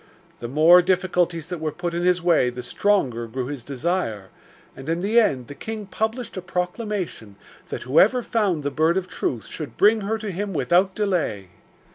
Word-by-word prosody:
The 120 - -5
more 160 +7 +6
difficulties 180 -3 0
that 180 - -4
were 155 -1 -2
put 175 +2 -4
in 170 - -1
his 180 0 +2
way 165 -8 +3
the 125 0 -7
stronger 125 - 0
grew 125 +2 -4
his 140 -2 -6
desire, 135 - -2 0.5
and 135 +3 -8
in 165 +1 0
the 215 +5 +4
end 135 - +1
the 145 - -9
king 220 +6 -6
published 220 +4 -3
a 185 - -4
proclamation 180 - -4 0.3
that - - -5
whoever 200 - +4
found 195 -11 0
the 145 - -2
Bird 160 +5 +2
of 185 -1 -2
Truth 120 -9 -3
should 155 -3 -7
bring 215 +2 +4
her 215 +3 -1
to 215 -2 -5
him 195 +2 -4
without 175 +7 +2
delay. 170 - -1
175 Hz, 185 wpm, -23 LUFS, 140-195 Hz, 0.5 s, more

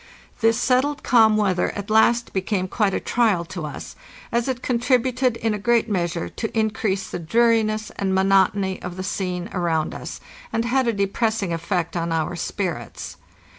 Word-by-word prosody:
This 225 +1 +3
settled 265 +4 +1
calm 220 -3 +5
weather 190 -4 +1
at 205 +1 -5
last 235 +2 +3
became 190 0 -1
quite 200 0 0
a - - 0
trial 215 -8 +1
to 165 -2 -6
us, 145 - -8 0.4
as 235 +1 0
it 255 -2 -3
con 245 -2 0
tributed 250 0 +1
in 225 -1 0
a 210 - -3
great 235 +2 +2
measure 175 -5 -1
to 225 0 -5
increase 210 -3 0
the - - -4
dreariness 220 +3 +2
and 195 -1 -1
monot 190 +1 +4
ony 190 -2 -2
of 180 0 -6
the 185 - -4
scene 180 -1 -3
around 165 -4 0
us, - - -7 0.3
and 230 - 0
had 255 +1 +1
a - - +3
depressing 200 -1 0
effect 170 +1 -2
on 170 -1 -1
our 165 +2 -1
spirits. 140 - -4
205 Hz, 175 wpm, -23 LUFS, 180-230 Hz, 0.4 s, calm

